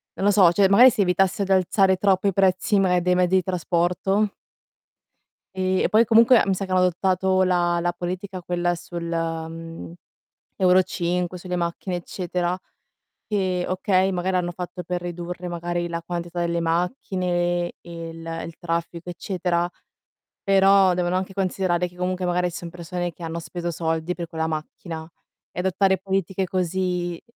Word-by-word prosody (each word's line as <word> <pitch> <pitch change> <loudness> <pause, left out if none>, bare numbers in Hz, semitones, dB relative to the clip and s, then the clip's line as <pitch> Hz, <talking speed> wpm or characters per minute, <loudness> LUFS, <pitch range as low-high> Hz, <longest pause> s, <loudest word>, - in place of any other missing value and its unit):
non 195 - -2
lo - - +6
so, 190 -4 +6
cioè 195 +2 +4
magari 245 +6 +8
si 205 - 0
evitasse 190 +2 +2
di 195 - -3
alzare 190 +1 +3
troppo 195 0 +2
i 195 - +2
prezzi, 195 +2 +2
magari, 180 -2 +3
dei 180 +1 +2
mezzi 180 +1 +2
di 185 - +3
trasporto 185 +3 0 1.2
e 185 0 +1
poi 220 +2 +5
comunque 230 +2 +6
mi 195 - +2
sa 195 - -3
che - - -13
hanno 185 - +4
adottato 185 +1 +2
la 175 -1 +2
la 175 0 0
politica 180 +1 -5
quella 175 0 0
sul, 170 0 -7
mhmm, 165 0 -4 0.6
Euro 185 0 +5
5, 180 0 -2
sulle 180 0 -4
macchine 175 +1 -2
eccetera. 175 0 -2 0.7
E 185 -4 0
okay, 185 +1 +2
magari 185 +1 0
hanno 175 -1 -1
fatto 180 0 -6
per 180 +1 -3
ridurre, 175 +1 -5
magari, 175 0 -3
la 170 0 -4
quantità 175 0 -4
delle 170 0 0
macchine 175 0 -1
e 170 -1 -8
il 165 0 -10 0.2
il 165 - -10
traffico 170 +1 -3
eccetera, 175 -1 -1 0.8
però, 195 -1 +5
devono 175 0 0
anche 190 +1 -2
considerare 185 -2 0
che 180 - -17
comunque 180 0 -2
magari 180 0 +1
ci - - -6
son 170 - -7
persone 175 0 -4
che 175 - -12
hanno 165 0 -4
speso 175 +1 -5
soldi 165 +1 -2
per 170 -1 -5
quella 160 0 -2
macchina 160 +1 -6 0.4
e - - -7
adottare 190 +1 +2
politiche 190 0 -1
così, 180 -1 -1
180 Hz, 160 wpm, -23 LUFS, 170-190 Hz, 1.2 s, magari